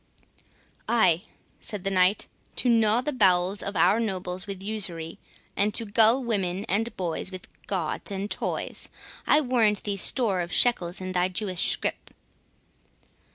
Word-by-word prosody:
"Ay," 185 -8 +3 0.4
said 205 -4 -5
the 195 - -1
Knight, 185 +2 +2 0.3
"to - - -1
gnaw 225 0 +3
the 295 +3 -3
bowels 190 -3 +2
of 200 - -5
our 180 +6 +3
nobles 185 -3 -3
with 195 -1 -6
usury, 180 -6 -1 0.4
and 205 +1 0
to 230 - +1
gull 225 +5 +4
women 195 -4 -2
and 220 +3 -2
boys 175 0 -3
with 185 -2 -9 0.2
gauds 180 -6 -3
and 200 +1 -5
toys—I 300 - -2
warrant 230 -6 +1
thee 200 -1 -2
store 200 -2 +3
of 175 0 -5
shekels 185 -8 +2
in 185 0 -5
thy 180 0 +1
Jewish 185 -1 -1
scrip." - - -4
200 Hz, 145 wpm, -26 LUFS, 180-220 Hz, 0.4 s, gull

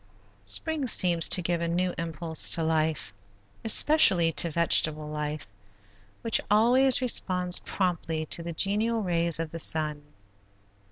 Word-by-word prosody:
Spring 285 - +1
seems 175 -7 +3
to 180 - +3
give 170 0 -2
a 170 - -2
new 180 +1 -2
impulse 165 -1 -1
to 165 - -3
life, 155 -8 -2 0.5
especially 210 - +3
to 170 - +1
vegetable 155 -2 +1
life, 150 0 -5 0.8
which 230 - 0
always 250 +5 +3
responds 180 -7 -1
promptly 165 -4 -3
to 170 - -3
the 170 0 -7
genial 215 +6 -1
rays 170 -3 -1
of 165 -2 -5
the 165 - -7
sun. 155 -2 -2
170 Hz, 130 wpm, -26 LUFS, 160-195 Hz, 0.8 s, seems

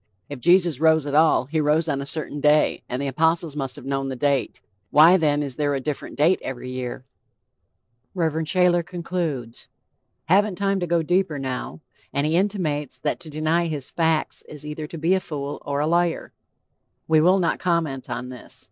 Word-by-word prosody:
If 145 -3 -7
Jesus 175 -1 +3
rose 160 -1 +4
at 145 - -4
all, 155 -4 +4
he 155 +4 -1
rose 155 +2 +2
on 140 -3 -1
a 140 - -6
certain 145 -1 -3
day, 150 +1 +3
and 125 - -3
the 140 - -2
apostles 160 +3 +1
must 135 -3 -3
have 145 - -10
known 135 0 -2
the 135 - -4
date. 140 0 0 0.3
Why 160 +7 +7
then 150 -4 +2
is 135 -3 -6
there 145 -1 0
a - - -1
different 145 +2 -5
date 160 +6 +3
every 125 -1 -6
year? 130 0 -5 1.1
Rev. 165 -4 0
Shayler 180 0 +3
concludes: 165 -9 -4 0.6
"Haven't 195 +4 +3
time 195 -1 0
to 175 - -2
go 170 -1 +1
deeper 175 -2 +1
now," 130 +3 -5 0.3
and 140 +1 0
he 155 +2 +1
intimates 165 -9 -1
that 145 +3 -2
to 170 -3 -10
deny 155 +3 0
his 145 -5 -4
'facts' 160 -2 0
is 150 -1 -9
either 150 0 -5
to 165 - -8
be 165 +4 +2
a 190 - +3
fool 145 -5 -6
or 140 0 -2
a - - +1
"liar." 170 +1 0 0.7
We 160 -1 +4
will 180 +4 +5
not 175 -3 0
comment 165 -7 -1
on 125 +1 -4
this. 125 -1 -10
155 Hz, 190 wpm, -23 LUFS, 140-170 Hz, 1.1 s, Why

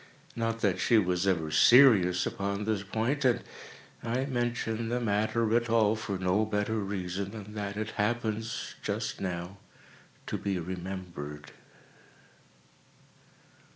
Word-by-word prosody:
Not 115 -1 -2
that 95 -3 +1
she 115 - +4
was 90 -2 +1
ever 80 -5 +1
serious 95 - +6
upon 100 +1 -2
this 110 -2 0
point—and 120 +5 0 0.6
I 125 +3 -1
mention 120 -3 -2
the 120 +1 0
matter 110 +1 +1
at 120 0 +1
all 110 -2 +4
for 105 -3 -4
no 90 +3 +1
better 110 +1 -1
reason 95 -1 -3
than 105 -1 -9
that 100 -1 -4
it 110 0 -3
happens, 110 +1 -2
just 105 +1 -3
now, 90 0 -4 0.7
to - - -3
be 100 -2 -1
remembered. 90 -4 -6
105 Hz, 120 wpm, -29 LUFS, 95-115 Hz, 0.7 s, serious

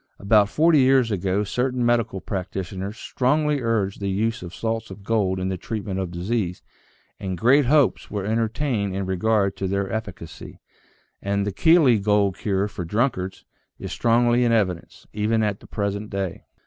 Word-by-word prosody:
About 100 0 +3
forty 160 +5 +4
years 130 -3 +4
ago 95 +1 0
certain 125 +4 -1
medical 115 -5 +1
practitioners 95 +2 -5
strongly 145 +4 0
urged 110 -5 -1
the 100 -1 -2
use 110 +5 -1
of 90 - -8
salts 115 +3 -3
of 95 +1 -11
gold 100 -4 0
in 95 0 -2
the 95 - -2
treatment 100 -1 -4
of 95 -2 -3
disease, 90 +1 -3 0.6
and 95 -2 -4
great 130 - +4
hopes 145 -1 +2
were 100 -2 -3
entertained 110 -1 -1
in 95 0 -2
regard 100 +2 +1
to 95 - -2
their 100 +2 -2
efficacy. 100 -7 -7 0.6
And 100 0 -1
the 105 - -1
Keeley 150 - +4
gold 100 -1 +2
cure 100 -1 -1
for 95 -3 -6
drunkards 95 0 -2 0.3
is - - -7
strongly 120 +1 +2
in 120 - +2
evidence, 95 -7 -1
even 110 +1 +1
at 105 -2 -1
the - - -16
present 100 0 -3
day. 95 -3 -4
105 Hz, 165 wpm, -23 LUFS, 95-115 Hz, 0.6 s, forty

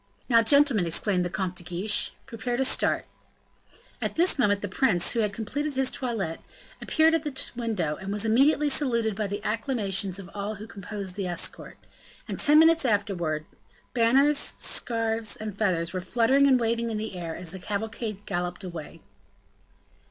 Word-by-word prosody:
"Now, 230 -3 +5
gentlemen," 260 - +4
exclaimed 180 +2 +1
the 175 - -2
Comte 185 0 -3
de 175 - -5
Guiche, 180 +5 0
"prepare 240 +2 -4
to 265 - +2
start." - - +1 1.0
At - - -2
this 345 -2 +3
moment 205 -5 +2
the - - -1
prince, 190 -3 +2
who 235 - -1
had 210 -2 +1
complete 245 +9 -3
his 265 0 +1
toilette, 220 -11 -3 0.4
appeared 320 +1 +3
at 330 - +1
the 290 -3 -4 0.2
window, 210 -11 -2
and 195 +1 -6
was 210 +1 0
immediately 280 +7 +3
saluted 235 -7 +1
by 210 0 -2
the 205 +1 -5
acclamations 210 -5 0
of 195 -3 -9
all 205 +1 -4
who 210 +2 -9
composed 200 -3 -6
the 195 -2 -2
escort, 175 0 -4 0.5
and - - -4
ten 295 +1 +5
minutes 325 0 +6
afterwards, 185 - 0 0.5
banners, 270 +5 +4
scarfs, 225 -5 0
and 215 -2 -6
feathers 180 -5 0
were 185 - -2
fluttering 245 +8 +3
and 260 -2 +5
waving 230 0 0
in 220 - -3
the 215 -2 -5
air, 170 -2 -5
as 170 -3 -5
the 190 - -7
cavalcade 210 +1 -4
galloped 180 0 -3
away. 170 -5 -8
215 Hz, 170 wpm, -26 LUFS, 190-245 Hz, 1.0 s, minutes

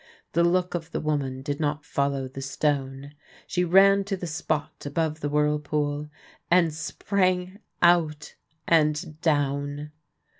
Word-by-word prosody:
The 170 - +2
look 180 +1 +2
of 165 -1 -4
the - - -3
woman 135 -4 -2
did 145 +1 -3
not 150 -1 -1
follow 140 -2 -1
the 135 +1 -8
stone. 135 0 -2 0.3
She 180 - 0
ran 195 +3 +5
to 195 -1 -2
the 180 - -5
spot 155 -2 -3
above 155 +2 -1
the 145 - -2
whirlpool, 150 0 0 0.4
and 170 -3 +4
sprang 185 +3 -1 0.2
out 160 -3 +3 0.3
and 155 0 +1
down. 145 -1 0
150 Hz, 135 wpm, -26 LUFS, 145-170 Hz, 0.4 s, ran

